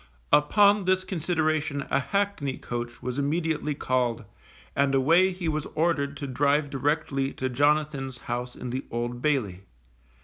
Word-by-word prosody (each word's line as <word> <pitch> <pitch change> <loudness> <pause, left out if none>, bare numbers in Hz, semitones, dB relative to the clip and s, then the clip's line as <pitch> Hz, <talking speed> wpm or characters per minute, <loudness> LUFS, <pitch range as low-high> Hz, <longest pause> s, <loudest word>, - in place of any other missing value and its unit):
Upon 200 +7 +5
this 185 0 +2
consideration 155 -5 -1
a - - +3
hackney 195 -4 -1
coach 120 0 -6
was 125 +2 -3
immediately 150 0 -1
called, 120 -4 -1 0.5
and 140 -1 +2
away 165 +8 +4
he 180 -2 -4
was 155 -1 -1
ordered 145 -4 0
to 140 - -5
drive 140 +2 +1
directly 140 -1 -1
to 130 - -2
Jonathan's 145 -1 +1
house 120 +1 -4
in 125 - -6
the 130 +2 -3
Old 120 +1 -3
Bailey. 120 -12 0
145 Hz, 140 wpm, -26 LUFS, 130-160 Hz, 0.5 s, Upon